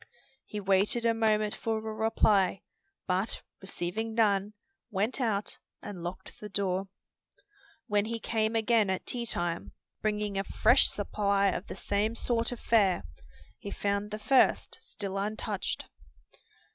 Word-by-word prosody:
He 210 - -4
waited 200 +4 +2
a 230 - +4
moment 215 -2 +2
for 225 -1 -2
a 220 0 -4
reply, 210 -3 +2 0.4
but 190 +4 -1 0.2
receiving 195 +4 -3
none, 205 -2 +2 0.4
went 215 +5 -1
out 210 -4 -1 0.2
and 200 -4 -7
locked 175 +2 -6
the 210 - -6
door. 195 -1 -1 1.0
When 205 0 +1
he 230 +1 -3
came 220 0 0
again 225 -2 +3
at 190 - -2
tea 240 -1 -3
time, 175 -6 -1 0.3
bringing 210 -2 -1
a - - 0
fresh - - +4
supply 200 -1 +1
of 185 +1 -3
the - - -6
same 210 +3 0
sort 235 0 0
of 245 - -5
fare, 200 -6 +3 0.6
he 200 - -6
found 200 +1 -1
the 210 - -4
first 260 +5 +3
still 195 -1 -5
untouched. 210 0 -3
210 Hz, 140 wpm, -30 LUFS, 195-220 Hz, 1.0 s, a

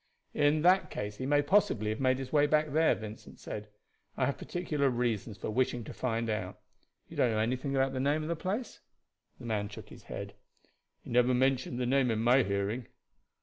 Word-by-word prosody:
"In 150 +1 +2
that 185 +2 +4
case 105 0 -5
he 130 - -3
may 145 +1 +3
possibly 145 - +2
have 110 - -4
made 130 -1 +2
his 135 +1 -6
way 145 -1 +5
back 155 0 +2
there," 160 +1 +4
Vincent 110 0 -10
said. 105 0 -6 0.5
"I - - +2
have 140 - -2
particular 150 -6 -1
reasons 120 -4 -1
for - - -4
wishing 125 0 0
to - - -8
find 115 -2 -1
out. 105 -4 -3 0.5
You - - -12
don't 125 - +3
know 110 - 0
anything 130 +5 -1
about 135 0 +2
the 130 - -2
name 145 +3 +1
of - - -4
the 170 - -1
place?" 200 +9 -4 0.6
The - - -10
man 105 -3 -1
shook 105 - -10
his - - -13
head. - - -6 0.7
"He - - -9
never 125 +1 +4
mentioned 130 -1 +1
the 125 - 0
name 130 0 +2
in 110 - +1
my 120 +4 +4
hearing." 100 +3 -2
130 Hz, 205 wpm, -31 LUFS, 110-145 Hz, 0.7 s, way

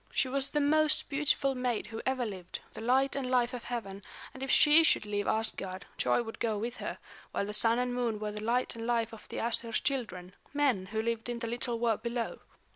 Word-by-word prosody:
She - - +2
was 270 +1 +1
the 295 - -1
most 310 +1 +3
beautiful 280 -1 +1
maid 250 -3 -1
who 225 0 -6
ever 260 -2 +1
lived, 185 -4 -6
the - - -8
light 260 +4 +2
and 265 -2 -2
life 250 -1 +2
of 245 - -6
heaven, 200 -5 -5 0.3
and 265 - -10
if 270 - -3
she 300 +4 +7
should 305 - +3
leave 205 -1 -2
Asgard, 195 -4 -1
joy 240 - +2
would 225 -1 -8
go 220 -2 0
with 235 +3 -4
her; - - -5 0.4
while - - 0
the 210 - -4
Sun 225 +2 +4
and 250 0 0
Moon 240 -3 0
were 210 0 -3
the 210 0 -6
light 235 +3 0
and 230 0 -5
life 230 -1 0
of 225 - -12
the - - -6
Æsir's 230 0 +1
children, 190 -10 -3 0.2
men, 260 -11 +2
who 220 +2 -2
lived 230 0 -2
in 240 - -2
the 235 - -4
little 240 +1 -1
world 230 -2 +1
below. 235 0 -3
235 Hz, 225 wpm, -31 LUFS, 220-255 Hz, 0.4 s, she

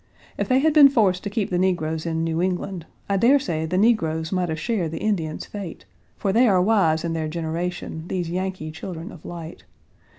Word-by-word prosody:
If - - -3
they 255 - +4
had 310 +3 +3
been 290 -2 +9
forced 200 -9 +2
to - - -1
keep 205 -1 -2
the 175 - +1
negroes 160 -3 0
in 160 0 -1
New 165 0 -1
England, 180 -2 -2 0.2
I 200 - +1
dare 245 +8 +5
say 165 - -2
the 180 +3 -1
negroes 165 -7 +2
might 180 -2 0
have 160 0 -3
shared 200 -5 -1
the 160 - -5
Indians' 165 -7 -2
fate, 195 - -8 0.3
for 195 - 0
they 240 +3 +5
are 190 -4 +4
wise 180 -6 +3
in 170 -1 -2
their 160 -1 -2
generation, 165 0 -4
these 180 -2 -2
Yankee 185 -2 -3
children 165 +4 -7
of 165 - -13
light. 170 -1 -8
180 Hz, 205 wpm, -23 LUFS, 160-200 Hz, 0.3 s, been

